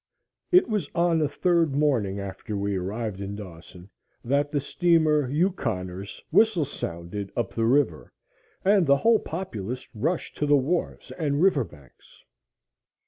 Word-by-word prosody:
It 365 +1 +6
was 215 -4 -2
on 170 -1 +3
the 150 -2 +1
third 165 -1 +1
morning 120 -10 +1
after 100 +2 -5
we 100 0 -1
arrived 100 +2 -3
in 100 +1 -5
Dawson 90 -2 -11 0.4
that 140 +3 +1
the 145 - +1
steamer 155 -2 +2
Yukoner's 110 - -2
whistle 215 -9 +4
sounded 95 -5 -6
up 120 -5 -2
the 115 - 0
river, 140 +3 +1 0.5
and 195 -4 +4
the 140 0 +5
whole 225 +6 +4
populace 125 - -5
rushed 145 +10 -2
to 150 - 0
the 145 0 +5
wharves 155 +7 -2
and 145 -3 0
river 170 -7 +4
banks. 70 - -18
140 Hz, 140 wpm, -26 LUFS, 100-165 Hz, 0.5 s, It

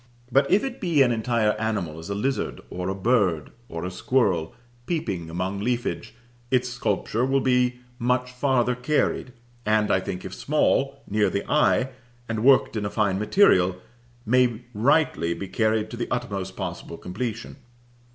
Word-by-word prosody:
But 135 +4 +3
if 200 - +4
it 265 -1 -5
be 165 -7 +4
an 125 - +2
entire 115 -1 +1
animal, 100 -8 -2
as 80 - -9
a 100 - -2
lizard, 130 +7 -2
or 90 +1 -3
a 95 - -2
bird, 95 -7 +1 0.2
or 85 +1 -5
a 90 - -4
squirrel, 95 -5 0 0.3
peeping 95 - -2
among 90 +4 -3
leafage, 120 +3 -2 0.3
its 125 -1 +1
sculpture 120 -1 -1
will 135 +1 +2
be 125 -1 +1 0.2
much 125 +1 0
farther 125 -1 +1
carried, 125 0 0 0.3
and 105 -1 +2
I - - +4
think, 90 0 -5
if - - -6
small, 140 -2 +1
near 105 0 +2
the 100 - -3
eye, 135 -3 +2 0.4
and 110 -1 -2
worked 135 -2 +5
in 105 - -1
a 100 - -1
fine 100 -2 0
material, 105 - +4 0.5
may 120 0 +2
rightly 115 - +2
be 100 - -6
carried 110 +1 0
to 120 - -6
the 120 - -2
utmost 100 -6 -3
possible 85 -3 -5
completion. 115 +6 -5
115 Hz, 160 wpm, -25 LUFS, 95-125 Hz, 0.5 s, worked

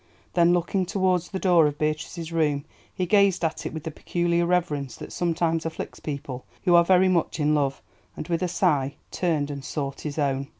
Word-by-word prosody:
Then 170 -1 +4
looking 180 +1 +1
towards 185 -2 +1
the 190 - -3
door 175 -5 +4
of 145 0 -3
Beatrice's 155 +2 -3
room, 150 -4 +1 0.3
he 185 - -2
gazed 195 -2 +3
at 160 - -2
it - - -6
with 160 -2 -6
the 160 - -4
peculiar 170 +2 0
reverence 155 -7 0
that - - -9
sometimes 165 -1 0
afflicts 165 0 -6
people 140 -4 -5 0.2
who 175 - +3
are 170 0 +7
very 185 +1 +4
much 170 -3 +1
in 150 0 +2
love, 140 -2 0 0.3
and, - - -5
with 170 -1 -1
a 180 - +1
sigh, 145 -6 +1 0.2
turned 155 -5 0
and 140 -1 -6
sought 140 -2 -4
his 150 -1 -5
own. 140 -2 0
165 Hz, 200 wpm, -25 LUFS, 145-175 Hz, 0.3 s, are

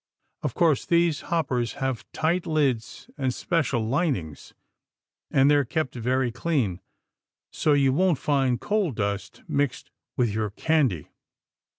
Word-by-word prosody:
Of - - -3
course, 160 -6 +2
these 170 -3 +2
hoppers 130 -8 0
have 130 -3 -4
tight 170 +3 0
lids 140 -8 -1
and 130 -2 +1
special 125 -6 -1
linings, 125 - -2 0.7
and 135 - +3
they're 145 -1 +4
kept 135 +1 -2
very 125 +1 0
clean, 120 - -1 0.7
so 150 - +2
you 135 -2 +3
won't 180 0 +3
find 135 -4 +1
coal 210 -4 0
dust 100 -2 -3
mixed 140 -3 -1 0.3
with 120 -4 +1
your 110 0 -1
candy. 130 - 0
135 Hz, 125 wpm, -25 LUFS, 120-160 Hz, 0.7 s, they're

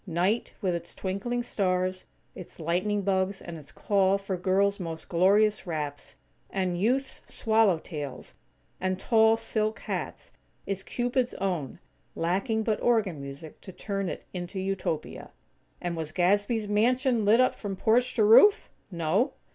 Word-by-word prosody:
Night, 185 +6 0
with 185 -2 +1
its 170 0 -5
twinkling 210 +6 -2
stars, 185 -3 -1 0.3
its 180 - -11
lightning 185 +5 0
bugs, 190 0 0
and 170 - -8
its 155 -1 -11
call 195 -1 +2
for 195 -1 -4
girls' 195 +3 +1
most 165 -3 -6
glorious 200 +4 +3
wraps; 150 -3 -5 0.3
and 185 -2 -2
youths' 260 +5 0
"swallowtails", 170 - 0 0.5
and 185 0 -1
tall 220 0 +4
silk 220 -1 -1
hats, - - -5 0.3
is 195 -1 -1
Cupid's 245 +4 -1
own; 175 -9 -3 0.4
lacking 200 +7 0
but 215 -1 -1
organ 210 -11 +1
music 140 +3 -9
to 190 - -10
turn 195 0 -3
it - - -7
into 180 +1 -5
Utopia. 190 -4 -3 0.5
And 175 -1 -3
was 160 -2 -4
Gadsby's 205 +5 +1
mansion 240 +3 +2
lit 215 +4 +5
up 255 - +4
from 200 -2 -5
porch 235 +5 +2
to 225 - +3
roof? 395 - +6 0.2
No. 175 - 0
195 Hz, 140 wpm, -27 LUFS, 175-220 Hz, 0.5 s, roof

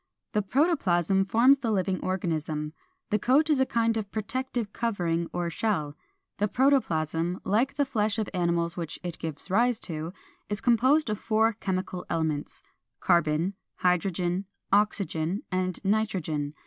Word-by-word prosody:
The 210 - +1
protoplasm 195 - +2
forms 245 +7 +5
the 235 - -2
living 190 -3 0
organism; 155 -4 -2 0.4
the 210 - +2
coat 295 +8 +3
is 290 - +3
a 265 - +3
kind 230 -1 +1
of 210 -2 -3
protective 225 0 -3
covering 175 -7 -1
or 175 -1 -2
shell. 155 -6 -1 0.4
The 210 - +2
protoplasm, 175 - +1
like 225 +8 +1
the 285 - +2
flesh 215 -3 0
of 215 -3 -1
animals 170 -2 0
which 165 -3 -4
it 175 -2 -5
gives 160 +3 -5
rise 235 +3 +3
to, 160 -1 -5 0.4
is 205 0 -2
composed 255 +3 +3
of 210 - -2
four 220 +1 +2
chemical 185 -3 -3
elements: 160 -3 -2 0.4
Carbon, 170 +2 +2 0.2
Hydrogen, 180 +1 0 0.3
Oxygen, 200 -3 +1
and 185 -1 -1
Nitrogen. 180 -8 -1
195 Hz, 140 wpm, -27 LUFS, 170-225 Hz, 0.4 s, forms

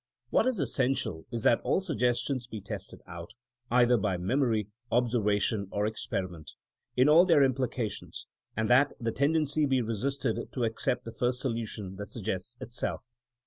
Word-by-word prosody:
What - - +3
is 255 -3 +1
essential 130 - -1
is 115 -2 -4
that 115 - +4
all - - +2
suggestions 125 -7 0
be 110 -3 -6
tested 100 0 -7
out, 85 -1 -9 0.4
either 120 0 +5
by 100 -3 0
memory, 110 +2 +1 0.2
observation 110 -4 +1
or 105 +1 0
experiment, 95 -6 -4 0.4
in 130 +2 +6
all 160 +4 +8
their 165 -6 +5
implications, 130 -5 -2 0.3
and 110 0 +1
that 135 +4 +5
the 115 -2 -1
tendency 150 +2 +2
be 135 -1 +2
resisted 120 +2 -2
to 125 - -1
accept 115 +3 -1
the 115 - -5
first 125 +1 -1
solu 115 -4 -1
tion 95 -3 -7
that 100 +1 -6
suggests 95 +1 -4
itself. 120 - -4
120 Hz, 155 wpm, -29 LUFS, 105-135 Hz, 0.4 s, all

